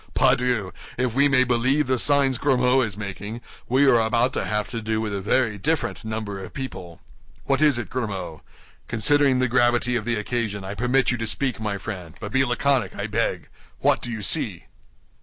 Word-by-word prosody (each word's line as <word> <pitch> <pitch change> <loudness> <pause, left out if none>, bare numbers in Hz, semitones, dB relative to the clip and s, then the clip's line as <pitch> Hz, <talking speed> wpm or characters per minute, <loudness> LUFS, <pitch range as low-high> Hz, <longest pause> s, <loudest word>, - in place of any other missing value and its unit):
Pardieu! 120 -7 +2 0.3
if 125 -2 0
we 140 +3 +4
may 135 -2 +4
believe 130 +4 +1
the 130 -1 0
signs 140 -3 +3
Grimaud 130 -2 +3
is 110 -5 -3
making, 100 +2 -6 0.3
we 130 +3 +4
are 125 -4 +5
about 115 +3 +1
to - - -2
have 105 0 -1
to 115 -2 -4
do 110 0 -1
with 110 -2 -3
a 100 - -3
very 110 +1 +1
different 160 +5 -1
number 110 -3 -5
of - - -11
people. 95 -11 -7 0.5
What 135 +1 +1
is 150 -5 +4
it, 120 -5 -4
Grimaud? 100 -10 -4 0.5
Considering 140 +4 +2
the 130 0 +2
gravity 120 0 +2
of 110 -3 -2
the 120 0 0
occasion, 105 -2 -3
I 95 +1 -5
permit 125 +4 +1
you 120 - -2
to 115 - -2
speak, 130 +1 -2
my 105 -2 -2
friend; 95 -5 -7
but 105 -1 -6
be 135 +3 +3
laconic, 130 -3 0
I - - -4
beg. - - -2 0.3
What - - +2
do 120 - -5
you 110 -3 -5
see?" - - +1
120 Hz, 195 wpm, -23 LUFS, 105-130 Hz, 0.5 s, are